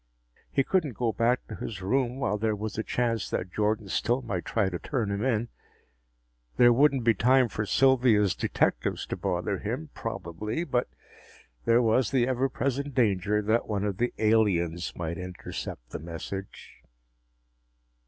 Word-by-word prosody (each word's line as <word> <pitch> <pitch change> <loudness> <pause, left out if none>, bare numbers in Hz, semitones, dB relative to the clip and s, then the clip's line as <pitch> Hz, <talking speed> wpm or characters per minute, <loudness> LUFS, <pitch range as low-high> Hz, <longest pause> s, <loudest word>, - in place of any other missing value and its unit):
He 135 - +2
couldn't 155 - 0
go 120 -2 +1
back 120 +3 +1
to - - -9
his 105 - -6
room 125 +4 0
while 105 -6 0
there 110 0 +1
was 105 0 -5
a 110 - -1
chance 115 -3 -1
that 90 - -3
Jordan 105 0 0
still 120 +6 0
might 95 -7 -3
try 110 -4 +1
to 90 -2 -3
turn 115 -8 -2
him 100 +2 -2
in. 120 -3 0 1.1
There 120 0 +7
wouldn't 135 0 +3
be 115 0 +5
time 125 +4 +4
for 105 +1 -3
Sylvia's 120 -7 +4
detectives - - 0
to - - -4
bother 95 +1 -2
him, 130 +8 -4
probably, 105 - -4
but 125 -6 0 0.8
there 115 +1 +4
was 115 +2 +3
the 125 -3 +2
ever 130 +1 +1
present 140 +1 -2
danger 105 -3 +2
that 110 +3 +1
one 100 -2 -1
of 100 -2 -2
the 120 +3 0
aliens 95 -6 +2
might 85 -1 -4
intercept 90 -9 -7
the - - -5
message. 85 +4 -8
110 Hz, 160 wpm, -28 LUFS, 100-125 Hz, 1.1 s, There